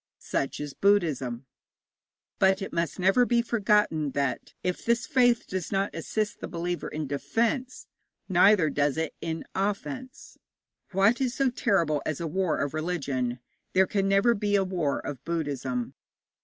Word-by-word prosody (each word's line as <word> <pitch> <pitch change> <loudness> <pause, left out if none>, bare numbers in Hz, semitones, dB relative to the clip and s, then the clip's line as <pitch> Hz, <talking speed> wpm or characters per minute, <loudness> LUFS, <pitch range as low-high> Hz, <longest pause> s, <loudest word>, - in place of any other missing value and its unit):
Such 135 - -2
is 145 -1 -5
Buddhism. 145 -11 +1 0.9
But 190 0 +4
it - - -7
must 170 -3 -1
never 195 +6 +4
be 240 -1 +2
forgotten 210 - +1
that, 140 -3 -2
if 180 -1 -2
this 235 +1 +1
faith 245 -4 +3
does 185 -3 -4
not 195 +1 0
assist 215 -1 -2
the - - -5
believer 175 +1 -3
in 155 0 -4
defence, 230 - -1 0.4
neither 185 -3 +5
does 145 0 +1
it 160 -1 -2
in 160 -1 -4
offence. 230 +7 -4 0.5
What 200 +6 +3
is 250 -2 0
so 270 -2 +2
terrible 170 - +1
as 155 - -3
a 170 - -3
war 170 +1 0
of 140 0 -2
religion? 140 -7 -2 0.4
There 190 +1 +5
can 195 0 0
never 195 +4 +4
be 205 -1 0
a 195 - +3
war 175 -7 -1
of 140 -4 -6
Buddhism. 140 -7 -2
185 Hz, 155 wpm, -27 LUFS, 150-210 Hz, 0.9 s, neither